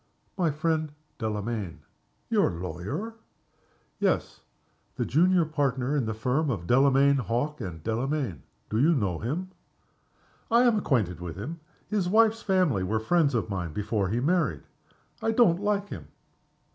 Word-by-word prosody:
"My 175 Hz, -4 st, +1 dB
friend, 155 Hz, 0 st, -1 dB, 0.3 s
Delamayn." 105 Hz, -6 st, -3 dB, 0.5 s
"Your -, -, +4 dB
lawyer?" 90 Hz, -, -5 dB, 0.9 s
"Yes -, -, 0 dB, 0.5 s
the -, -, -1 dB
junior 175 Hz, +4 st, +3 dB
partner 140 Hz, -3 st, 0 dB
in 135 Hz, -6 st, 0 dB
the 110 Hz, -, -2 dB
firm 130 Hz, +7 st, 0 dB
of 100 Hz, -9 st, -2 dB
Delamayn, 135 Hz, +5 st, +4 dB
Hawke, 125 Hz, +5 st, -2 dB
and 85 Hz, -4 st, -6 dB
Delamayn. 120 Hz, -, -2 dB, 0.3 s
Do 110 Hz, -, +1 dB
you 160 Hz, +6 st, +4 dB
know 95 Hz, -, -1 dB
him?" 165 Hz, +11 st, -3 dB, 1.0 s
"I 235 Hz, +2 st, +5 dB
am 235 Hz, -4 st, +4 dB
acquainted 110 Hz, -, 0 dB
with 85 Hz, -2 st, -6 dB
him. 150 Hz, -, -6 dB, 0.3 s
His 200 Hz, -4 st, 0 dB
wife's 225 Hz, +2 st, +4 dB
family 185 Hz, -, +2 dB
were 110 Hz, +4 st, 0 dB
friends 145 Hz, +3 st, +2 dB
of 110 Hz, -2 st, -1 dB
mine 90 Hz, -5 st, -3 dB
before 105 Hz, -1 st, -1 dB
he 115 Hz, +4 st, 0 dB
married. 145 Hz, -, +1 dB, 0.6 s
I 225 Hz, -, +1 dB
don't 205 Hz, -7 st, +4 dB
like 205 Hz, -1 st, 0 dB
him." -, -, -8 dB
135 Hz, 145 wpm, -27 LUFS, 105-170 Hz, 1.0 s, I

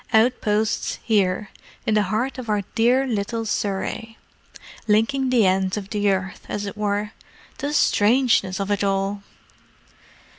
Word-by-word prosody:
Outposts 220 Hz, -2 st, +2 dB
here, 200 Hz, -2 st, +1 dB, 0.3 s
in 220 Hz, -, +1 dB
the 210 Hz, -, +4 dB
heart 245 Hz, +6 st, -1 dB
of 240 Hz, -3 st, -7 dB
our 210 Hz, -1 st, +1 dB
dear 245 Hz, +4 st, +3 dB
little 225 Hz, -1 st, -2 dB
Surrey! 215 Hz, +2 st, -3 dB, 0.7 s
Linking 225 Hz, +5 st, +2 dB
the 240 Hz, -5 st, +4 dB
ends 190 Hz, +1 st, +1 dB
of 200 Hz, -1 st, -6 dB
the 205 Hz, -1 st, +1 dB
earth, 190 Hz, -1 st, -2 dB
as 205 Hz, -, -3 dB
it 200 Hz, -, -6 dB
were. 210 Hz, 0 st, -1 dB, 0.5 s
The 285 Hz, -, -2 dB
strangeness 220 Hz, -7 st, +3 dB
of 200 Hz, +1 st, -2 dB
it 205 Hz, 0 st, 0 dB
all!" 195 Hz, +1 st, 0 dB
210 Hz, 140 wpm, -23 LUFS, 200-225 Hz, 0.7 s, the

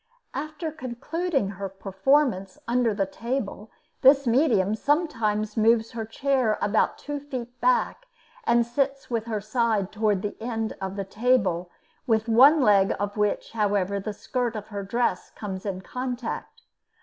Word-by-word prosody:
After 310 Hz, +3 st, -4 dB
concluding 290 Hz, -, -2 dB
her 200 Hz, 0 st, -5 dB
performances 195 Hz, +1 st, +1 dB
under 240 Hz, -1 st, +2 dB
the 200 Hz, -1 st, 0 dB
table, 225 Hz, 0 st, -4 dB, 0.3 s
this 275 Hz, +1 st, +6 dB
medium 230 Hz, -6 st, +3 dB
sometimes 220 Hz, -7 st, 0 dB
moves 225 Hz, +1 st, +3 dB
her 225 Hz, -1 st, -4 dB
chair 255 Hz, -2 st, +1 dB
about 210 Hz, +1 st, +1 dB
two 290 Hz, -1 st, -5 dB
feet 255 Hz, -4 st, -7 dB
back -, -, +1 dB, 0.4 s
and 235 Hz, -, +3 dB
sits 275 Hz, +2 st, -2 dB
with 230 Hz, -2 st, -1 dB
her 220 Hz, -2 st, -2 dB
side 215 Hz, -2 st, 0 dB
toward 210 Hz, -3 st, +1 dB
the 205 Hz, -, -3 dB
end 225 Hz, -1 st, -3 dB
of 190 Hz, 0 st, -4 dB
the 200 Hz, -1 st, -3 dB
table, 195 Hz, -5 st, +1 dB, 0.4 s
with 220 Hz, -1 st, +2 dB
one 270 Hz, +7 st, +7 dB
leg 200 Hz, -5 st, +4 dB
of 205 Hz, 0 st, -2 dB
which, 210 Hz, -1 st, 0 dB
however, 200 Hz, -3 st, 0 dB
the 215 Hz, +2 st, -4 dB
skirt 240 Hz, +2 st, -2 dB
of 215 Hz, -1 st, -6 dB
her 200 Hz, -2 st, -4 dB
dress 200 Hz, -1 st, -1 dB
comes 195 Hz, -1 st, -5 dB
in 190 Hz, -1 st, -3 dB
contact. 250 Hz, +2 st, -5 dB
225 Hz, 150 wpm, -26 LUFS, 205-255 Hz, 0.4 s, one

